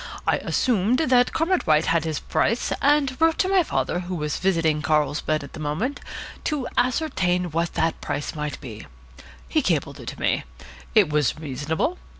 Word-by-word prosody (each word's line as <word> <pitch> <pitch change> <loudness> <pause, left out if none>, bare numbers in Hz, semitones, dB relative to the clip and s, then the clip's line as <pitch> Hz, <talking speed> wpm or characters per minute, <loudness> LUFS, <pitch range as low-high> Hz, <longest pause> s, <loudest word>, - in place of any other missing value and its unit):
I - - +3
assumed 235 -1 +1
that 255 -4 +3
Comrade 345 +3 0
White 155 0 +4
had 165 -1 +1
his 155 -2 -2
price, 230 - 0
and 285 -2 +3
wrote 325 0 +4
to 375 - +2
my 380 -1 +4
father, 295 - -1
who 180 0 -4
was 150 -3 -2
visiting 165 -5 +1
Carlsbad 150 0 +1
at 140 - -11
the 165 - -8
moment, 160 - -2 0.5
to 295 -5 -1
ascertain 190 - +1
what 165 +2 -1
that 165 0 0
price 145 - -3
might 150 -2 -4
be. 110 - -9 0.6
He 65 - +2
cabled - - -1
it - - -10
to - - -6
me. - - +1 0.5
It 200 -8 +5
was 150 -4 +1
reasonable. 155 - -2
175 Hz, 170 wpm, -24 LUFS, 150-255 Hz, 0.6 s, It